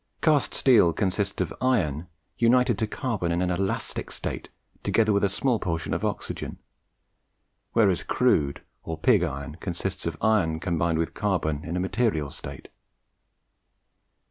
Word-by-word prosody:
Cast 155 -3 +2
steel 105 -11 +5
consists 100 0 -1
of 85 - -6
iron 90 - +1 0.3
united 120 0 +4
to 110 - 0
carbon 110 -8 -2
in 85 - 0
an 90 - 0
elastic 95 +2 -2
state - - -5 0.3
together 110 -2 +2
with 100 - +2
a 100 - +4
small 120 +3 +1
portion 80 -2 -2
of - - -2
oxygen; - - -3 1.2
whereas 100 -6 +3
crude 70 -1 +1 0.2
or 80 -1 -5
pig 105 +3 +4
iron 75 -1 -4
consists 90 0 -3
of 80 -1 -3
iron 95 -8 +2
combined 85 -2 0
with 85 0 -1
carbon 85 -7 -1
in 85 0 -3
a - - 0
material 95 - 0
state. 70 0 -8
90 Hz, 145 wpm, -26 LUFS, 80-110 Hz, 1.2 s, steel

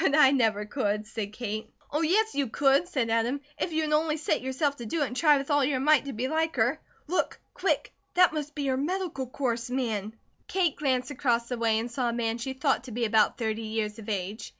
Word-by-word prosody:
"But 280 - +3
I 270 -3 +7
never 220 -6 +2
could," 210 -3 -1
said 210 -1 -5
Kate. 215 -1 -5 0.2
"Oh, 300 - 0
yes, 430 +7 +2
you 280 -2 0
could," 275 +7 +3
said 235 -8 -1
Adam, 230 +5 +1 0.2
"if 345 - -1
you 315 0 0
would 300 -1 -1
only 310 0 +2
set 300 - 0
yourself 270 +2 -1
to 235 - -7
do 305 +6 0
it - - +2
and 250 - -6
try 300 0 +5
with 275 +2 -3
all 290 -1 +4
your 265 -1 +1
might 295 +1 +4
to 275 - -5
be 240 +4 -2
like 320 +2 0
her. - - +2 0.3
Look, 360 +4 -1
quick! - - -1 0.2
That 360 -2 +5
must 300 -1 -4
be 290 -2 -2
her 260 -1 +1
'Medical 310 -3 -2
Course' 240 -2 -2
man!" 225 -5 -2 0.3
Kate 355 -6 +1
glanced 260 -2 0
across 240 -4 0
the 245 - -2
way 225 -1 +2
and 230 +2 -3
saw 245 0 0
a - - -2
man 230 0 -1
she 265 +3 -3
thought 265 -1 0
to 255 - -8
be 235 +1 -1
about 215 -1 +3
thirty 220 -2 -2
years 215 -1 -3
of 220 0 -8
age. 205 +2 -3
260 Hz, 240 wpm, -28 LUFS, 225-295 Hz, 0.3 s, I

